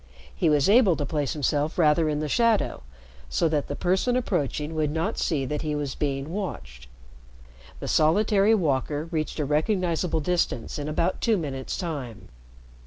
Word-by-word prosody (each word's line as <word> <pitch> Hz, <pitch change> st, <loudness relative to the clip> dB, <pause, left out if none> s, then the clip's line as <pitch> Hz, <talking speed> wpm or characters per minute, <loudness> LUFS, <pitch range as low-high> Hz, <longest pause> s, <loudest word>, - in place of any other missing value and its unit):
He 170 Hz, -, +2 dB
was 145 Hz, -2 st, +3 dB
able 205 Hz, -4 st, +5 dB
to 145 Hz, -, -3 dB
place 145 Hz, -2 st, -1 dB
himself 150 Hz, +1 st, -1 dB
rather 155 Hz, -1 st, +3 dB
in 150 Hz, 0 st, -1 dB
the 155 Hz, -, -2 dB
shadow 230 Hz, +4 st, +1 dB, 0.5 s
so 165 Hz, -, +1 dB
that 150 Hz, -2 st, -1 dB
the 145 Hz, -, -4 dB
person 190 Hz, -, +1 dB
approaching 155 Hz, -, -1 dB
would 155 Hz, -2 st, 0 dB
not 165 Hz, +8 st, -2 dB
see 145 Hz, -6 st, 0 dB
that 150 Hz, +3 st, -3 dB
he 155 Hz, -2 st, -2 dB
was 145 Hz, -3 st, -3 dB
being 140 Hz, +1 st, -3 dB
watched. 65 Hz, -, -6 dB, 0.9 s
The -, -, -6 dB
solitary 205 Hz, +6 st, +3 dB
walker 150 Hz, -4 st, 0 dB
reached 155 Hz, -2 st, -2 dB
a 150 Hz, -, 0 dB
recognizable 165 Hz, +2 st, 0 dB
distance 165 Hz, -6 st, -1 dB
in 145 Hz, -, -4 dB
about 170 Hz, +4 st, -1 dB
two 225 Hz, -3 st, +2 dB
minutes' 135 Hz, -6 st, -4 dB
time. 130 Hz, -, -6 dB
155 Hz, 165 wpm, -25 LUFS, 145-180 Hz, 0.9 s, able